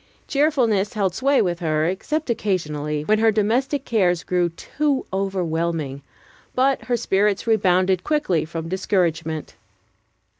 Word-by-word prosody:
Cheerfulness 255 -9 +1
held 195 -5 0
sway 275 +7 +2
with 175 -2 -2
her, 155 -2 0
except 255 - -2
occasionally, 150 -8 -2
when 215 +6 +2
her 225 0 +4
domestic 250 +7 0
cares 180 -6 +1
grew 180 -1 +1
too 280 - -2
overwhelming; 170 -7 -2 0.5
but 265 +1 +2
her 245 -1 0
spirits 200 -2 +1
rebounded 185 -4 +2
quickly 295 - +1
from 165 +1 -6
discouragement. 165 -4 -1
190 Hz, 120 wpm, -22 LUFS, 165-230 Hz, 0.5 s, her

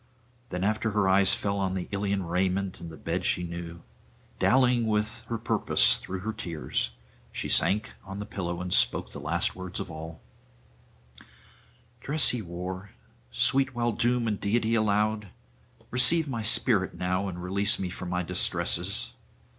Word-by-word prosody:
Then 90 0 -3
after 110 +2 0
her 105 -2 +2
eyes 95 0 +5
fell 100 0 -2
on 95 -1 -1
the 90 - -3
Ilian 100 -1 -1
raiment 90 +2 -1
and 85 - -7
the 80 - -10
bed - - -3
she 90 - +1
knew, 85 0 -7 0.6
dallying 125 -1 +4
a - - -1
little - - +1
with 105 +2 -1
her 115 - -2
purpose 115 - +3
through 95 0 -6
her 110 +3 -3
tears, 85 - -3 0.4
she - - -3
sank 105 +2 +2
on 95 0 -8
the 105 - -5
pillow 90 -3 -4
and 90 0 -2
spoke - - +3
the - - -8
last 80 +4 -1
words 90 -1 -5
of - - -5
all: 80 +1 -8 1.8
'Dress 150 +4 +4
he 125 - -1
wore, 90 +2 -6 0.4
sweet 130 +2 +2
while 120 0 +1
doom 120 +1 +1
and 105 -2 -2
deity 110 +2 +1
allowed! 105 -1 +1 0.6
receive 155 +6 +3
my 120 -5 -3
spirit 110 -3 +2
now, 90 +2 -1
and 90 -2 -6
release 100 +3 +3
me 95 - -3
from 90 0 -6
my 90 0 -1
distresses. - - 0
100 Hz, 165 wpm, -27 LUFS, 90-110 Hz, 1.8 s, eyes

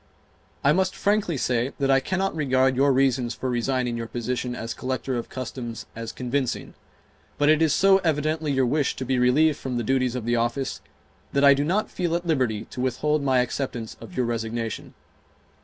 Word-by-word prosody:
I 140 - +5
must 185 +2 +1
frankly 200 -6 +1
say 125 +1 0
that 135 -1 +1
I 135 - +5
cannot 190 +7 -1
regard 130 -3 +2
your 140 +2 +4
reasons 130 -3 +1
for 130 - -3
resigning 125 0 0
your 115 -1 -4
position 125 +1 -3
as 115 -1 -4
Collector 130 0 -3
of 120 - -4
Customs 120 -2 -6
as 115 -1 -5
convincing, 130 +1 -2 0.6
but 145 +1 +3
it 155 0 +4
is 160 -2 +4
so 195 +5 +5
evidently 155 -2 0
your 135 -1 +2
wish 145 +2 +1
to 130 - -5
be 130 0 +1
relieved 140 +5 +3
from 125 -2 -3
the 120 - -1
duties 130 +1 +1
of 125 -3 -4
the 120 0 +1
office 120 +3 -1 0.5
that 140 - +2
I 140 0 +8
do 140 +1 0
not 190 +8 0
feel 170 -2 -1
at 175 +1 -2
liberty 130 -10 0
to 125 - -5
withhold 150 +4 0
my 130 -2 +3
acceptance 125 -3 -4
of 180 - -10
your 125 - +2
resignation. 115 -1 -4
130 Hz, 190 wpm, -25 LUFS, 120-150 Hz, 0.6 s, I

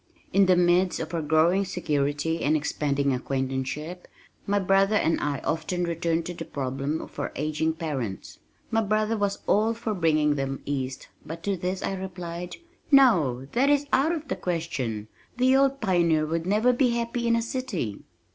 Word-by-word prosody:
In 195 -1 +5
the 185 - +5
midst 180 +1 +3
of 160 +1 -5
our 165 - 0
growing 160 +5 +3
security 150 -3 -1
and 155 +2 +3
expanding 140 -2 0
acquaintanceship, 135 +6 -3 0.4
my 205 +1 +2
brother 195 +2 +3
and 165 -5 +2
I 145 -2 -2
often 165 +3 -1
returned 170 -1 -1
to 175 - -4
the 165 - -6
problem 140 +2 -3
of - - -10
our - - -2
aging 155 +2 -1
parents. 140 - -5 0.3
My 225 - +3
brother 215 +1 +1
was 205 -2 -2
all 220 +2 +2
for 225 -1 -3
bringing 155 -5 +2
them 135 -1 -3
east 135 -2 -4
but 165 +1 -8
to 200 -1 0
this 185 +1 -3
I - - -1
replied, 180 -2 -6 0.3
"No, 175 - +4
that 265 +4 +2
is 290 0 +3
out 295 +5 +4
of 315 -3 -4
the - - -2
question. 145 - -3 0.3
The 255 +1 +4
old 275 0 +3
pioneer 170 -6 +2
would 165 +2 -2
never 215 +5 +3
be 245 -1 +2
happy 235 0 -2
in 230 - +4
a 230 - +1
city." 230 - -3
170 Hz, 175 wpm, -26 LUFS, 150-210 Hz, 0.4 s, In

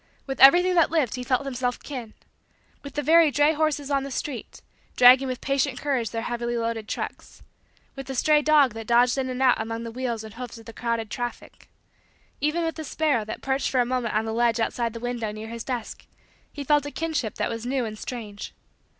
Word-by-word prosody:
With 270 -1 -5
everything 350 +7 +7
that 335 -3 +4
lived 305 -8 +1
he 250 - -4
felt 255 +2 0
himself 250 -2 -2
kin. 245 -6 -8 0.7
With 280 -1 -10
the 295 - -1
very 325 +1 +6
dray 290 +3 +3
horses 295 -2 -1
on 275 -1 +2
the 275 - -6
street, 260 -2 -6 0.3
dragging 255 +2 +7
with 255 -1 -4
patient 275 -1 0
courage 260 -6 -1
their 225 +1 -4
heavily 240 0 -2
loaded 230 -2 -3
trucks; - - -6 0.5
with 270 -1 -8
the 265 - -5
stray 300 +4 +4
dog 295 -5 +4
that 225 -1 -8
dodged 245 +2 +4
in 260 -1 -2
and 255 0 -4
out 250 -3 +4
among 225 +1 -4
the 230 - -6
wheels 235 -2 -3
and 220 -1 -10
hoofs 240 0 -8
of 225 - -14
the 230 - -10
crowded 230 -2 -3
traffic; 240 -1 -6 0.7
even 305 +3 0
with 325 0 -2
the 315 - -5
sparrow 295 -6 0
that 215 - -7
perched 270 0 0
for 260 - +1
a 245 - +3
moment 245 -3 -2
on 215 +1 +1
the 220 - -3
ledge 235 0 +2
outside 230 0 -1
the 230 - -6
window 240 -2 -3
near 215 +1 -8
his 230 -1 -6
desk, 245 -4 -5 0.4
he 290 - -6
felt 290 0 +2
a - - -3
kinship 310 -8 -3
that - - -2
was 230 0 -5
new 260 -1 0
and 215 -1 -7
strange. 215 -5 -7
250 Hz, 220 wpm, -25 LUFS, 230-280 Hz, 0.7 s, everything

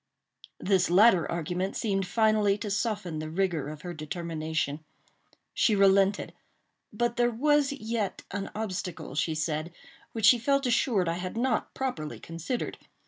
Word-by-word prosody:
This 190 -3 +2
latter 185 -1 +5
argument 175 +3 -2
seemed 195 -4 -1
finally 215 0 +3
to 210 0 -5
soften 200 -7 -2
the 155 0 -5
rigor 165 -4 -1
of 150 0 -9
her 175 -1 -5
determination. 160 -2 -3 0.7
She 220 - +3
relented; 195 0 +3 0.6
but 240 +3 -1
there 240 0 +3
was 285 +4 +2
yet 225 -6 -3
an 195 0 -4
obstacle, 185 -8 -4
she 155 +2 0
said, 155 +1 -2 0.4
which 225 -2 -1
she 240 +2 +7
felt 275 +3 +1
assured 230 -6 +2
I 165 +1 -1
had 185 +4 -5
not 255 +2 0
properly 205 -14 -3
considered. 165 +9 -4
195 Hz, 140 wpm, -28 LUFS, 165-225 Hz, 0.7 s, she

